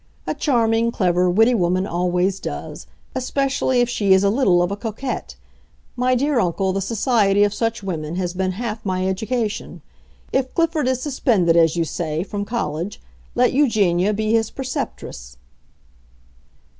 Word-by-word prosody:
A - - -1
charming, 230 -4 +1
clever, 180 -3 +2
witty 225 +7 +4
woman 185 -3 +1
always 180 +2 0
does—especially 255 - -2
if 245 - +2
she 205 -5 +2
is 190 +1 +4
a 200 - +3
little 195 -8 +3
of 175 - -1
a - - -1
coquette. 225 +5 -5 0.6
My 255 +1 +2
dear 280 +1 +1
uncle, 190 0 0
the 195 - -1
society 205 -2 +2
of 205 -1 +1
such 225 -1 -2
women 165 -4 -4
has 180 -1 -2
been 185 0 -1
half 220 +1 -4
my 185 -1 -1
education. 220 +3 -3 0.5
If 260 -1 0
Clifford 330 -5 +1
is 255 -1 0
suspended, 220 - +2
as 165 -1 +4
you 170 -1 +1
say, 160 0 -3
from 205 +1 -4
college, 200 -5 -3 0.4
let 250 0 +3
Eugenia 210 -9 +2
be 215 +1 -1
his 225 -1 +2
preceptress." 60 - -6
205 Hz, 150 wpm, -21 LUFS, 180-245 Hz, 0.6 s, witty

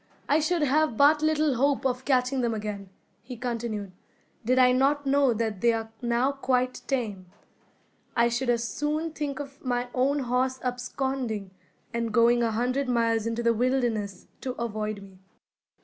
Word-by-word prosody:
"I 295 - +4
should 320 +1 +1
have 295 -3 +2
but 295 +2 +5
little 310 -2 +2
hope 280 +1 +1
of 255 0 -1
catching 255 -1 +2
them 235 -2 0
again," 205 -2 -5 0.3
he 245 +1 -9
continued, 230 -4 -3 0.5
"did 255 +3 +2
I 250 -1 +6
not 280 +3 +2
know 275 -1 +3
that 220 -3 -2
they 235 -1 +4
are 225 0 -4
now 240 +3 +1
quite 255 -2 0
tame. 215 -9 -2 0.9
I 235 0 +4
should 240 +2 -1
as 235 -1 +1
soon 305 +4 -2
think 295 -3 -4
of 280 -1 -9
my 245 -1 -1
own 275 +3 +1
horse 255 +1 0
absconding, 250 -4 -3 0.4
and 235 -1 -1
going 235 +2 +4
a 230 - +2
hundred 250 +4 -1
miles 230 -2 +1
into 230 +1 -2
the 235 0 +4
wilderness, 235 -4 -1 0.2
to 255 - -3
avoid 215 -3 -4
me. 190 -1 -16
250 Hz, 165 wpm, -27 LUFS, 230-270 Hz, 0.9 s, I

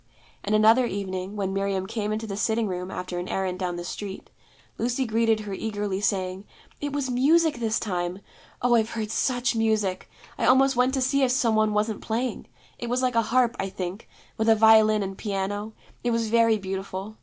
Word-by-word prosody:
And 210 +1 +1
another 225 +4 +5
evening, 190 -1 -4
when 195 -2 -2
Miriam 195 -1 -1
came 210 +1 -3
into 220 +1 -2
the 200 -3 -5
sitting 220 +2 0
room 180 -1 -4
after 180 -1 -5
an 175 - -5
errand 185 -1 -2
down 180 -2 -2
the 175 - -5
street, 195 +2 -7 0.5
Lucy 245 +2 0
greeted 225 -1 +1
her 205 -2 -6
eagerly, 205 -1 -3
saying, 190 -1 -1 0.3
'It 290 0 -3
was 275 -2 -2
music 300 +3 +3
this 225 -1 0
time. 180 -3 -2 0.5
Oh, 245 -1 +4
I've 225 -1 +3
heard 220 -2 -4
such 245 0 0
music! 215 -4 0 0.3
I - - +1
almost 265 +2 +5
went 250 +2 +2
to 265 - 0
see 275 +2 +2
if 260 - +3
some 245 -3 +2
one 215 0 +3
wasn't 210 0 -1
playing. 240 +3 -3 0.3
It 240 - -4
was 250 +1 0
like 250 -1 +1
a 230 - +3
harp, 235 +1 +2
I 195 - -2
think, 185 +2 -6 0.3
with 220 +1 +2
a 225 - +7
violin 215 -1 +5
and 195 0 -5
piano: 205 +1 -3 0.3
it 240 - +1
was 230 -1 0
very 230 -1 +4
beautiful. 195 +1 -5
215 Hz, 200 wpm, -25 LUFS, 195-235 Hz, 0.5 s, a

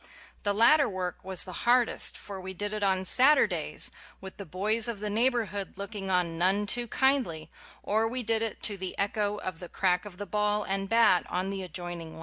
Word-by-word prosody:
The 205 -1 0
latter 260 +5 +5
work 185 -2 -5
was 190 -2 0
the 185 - -8 0.2
hardest: 245 -1 +3
for 195 -2 -8
we 190 0 -7
did 205 +3 -3
it 215 - -3
on 190 -1 +1
Saturdays 265 +10 +3 0.3
with 190 0 -10
the 200 - -8
boys 210 +7 0
of 230 -4 -4
the 210 0 -3
neighborhood 220 -5 0
looking 200 -1 -6
on 175 -3 0
none 195 +4 +2
too 240 +3 -1
kindly, 255 - 0 0.3
or 220 +2 +1
we 250 +2 -2
did 225 0 +1
it 225 -1 -2
to 205 - +1
the 185 -1 -5
echo 205 +1 -1
of 185 -4 -6
the 175 - -9
crack 180 -1 0
of 195 -3 -10
the 205 - -5
ball 210 +1 0
and 195 0 -2
bat 230 -6 +4
on 185 +2 -2
the 195 -1 -4
adjoining 175 -2 -7
lot! - - -11
200 Hz, 205 wpm, -28 LUFS, 185-220 Hz, 0.3 s, latter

